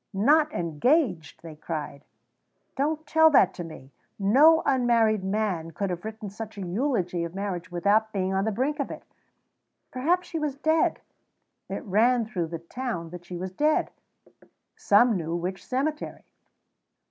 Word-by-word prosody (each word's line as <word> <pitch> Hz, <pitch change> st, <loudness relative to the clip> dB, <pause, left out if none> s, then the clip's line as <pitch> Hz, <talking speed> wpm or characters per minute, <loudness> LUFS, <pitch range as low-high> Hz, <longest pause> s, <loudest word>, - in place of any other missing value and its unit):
"Not 300 Hz, +9 st, +4 dB
engaged!" 175 Hz, -, 0 dB
they 160 Hz, -2 st, -9 dB
cried. 150 Hz, -2 st, -6 dB, 0.7 s
"Don't 305 Hz, +3 st, -1 dB
tell 320 Hz, +2 st, +5 dB
that 255 Hz, -, +4 dB
to 175 Hz, -, -6 dB
me. 155 Hz, -5 st, -11 dB, 0.3 s
No 280 Hz, +11 st, +5 dB
unmarried 235 Hz, -6 st, +2 dB
man 190 Hz, -4 st, -1 dB
could 190 Hz, +4 st, -3 dB
have 175 Hz, -1 st, -5 dB
written 220 Hz, 0 st, -6 dB
such 220 Hz, +1 st, -8 dB
a -, -, -5 dB
eulogy 180 Hz, -4 st, -1 dB
of 170 Hz, +1 st, -6 dB
marriage 185 Hz, -3 st, -4 dB
without 205 Hz, +5 st, +2 dB
being 190 Hz, -2 st, -1 dB
on 190 Hz, 0 st, +1 dB
the 220 Hz, -, 0 dB
brink 270 Hz, +8 st, -1 dB
of 280 Hz, -, -2 dB
it." -, -, -8 dB, 0.9 s
Perhaps 345 Hz, +8 st, 0 dB
she 325 Hz, -, -4 dB
was 300 Hz, -3 st, -2 dB
dead? 315 Hz, +2 st, +1 dB, 0.7 s
It 195 Hz, -, -4 dB
ran 230 Hz, +4 st, +2 dB
through 180 Hz, -6 st, -3 dB
the 165 Hz, +1 st, -5 dB
town 170 Hz, -1 st, -5 dB
that 175 Hz, 0 st, -9 dB
she 175 Hz, 0 st, -7 dB
was 185 Hz, +1 st, -5 dB
dead. 300 Hz, +10 st, +1 dB, 0.8 s
Some 220 Hz, +3 st, +4 dB
knew 165 Hz, -1 st, -3 dB
which 180 Hz, +2 st, -4 dB
cemetery. 295 Hz, +4 st, -3 dB
210 Hz, 155 wpm, -26 LUFS, 175-265 Hz, 0.9 s, tell